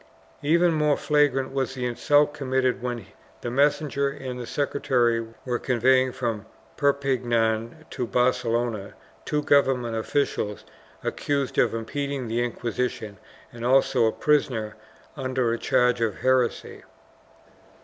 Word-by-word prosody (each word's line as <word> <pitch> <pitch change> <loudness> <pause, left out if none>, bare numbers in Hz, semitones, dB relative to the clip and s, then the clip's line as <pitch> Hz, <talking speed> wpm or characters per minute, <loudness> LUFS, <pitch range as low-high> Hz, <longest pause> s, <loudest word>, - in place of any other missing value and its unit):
Even 170 +3 +3
more 150 -2 +2
flagrant 145 -3 +1
was 135 -1 -2
the 125 -1 -3
insult 145 +4 +2
committed 130 -3 0
when 120 -4 -4 0.4
the 120 - -4
messenger 140 +1 +1
and 130 -3 -6
the 120 - -6
secretary 125 -5 +1 0.2
were 125 -2 -1
conveying 130 +1 +3
from 115 -5 -3 0.3
Perpignan 125 -2 0
to 125 - -3
Barcelona 120 -4 0 0.3
two 150 0 -1
government 130 -5 +2
officials 110 -3 -2 0.4
accused 140 -3 -1
of - - +2
impeding 140 +3 -3
the 115 +2 0
Inquisition 115 -3 -3 0.3
and 120 -1 -8
also 130 -2 +3
a - - +2
prisoner 120 -8 0 0.4
under 130 -4 -1
a 115 - -3
charge 125 -1 +2
of 110 -3 -1
heresy. 130 -2 0
125 Hz, 120 wpm, -25 LUFS, 120-140 Hz, 0.4 s, Even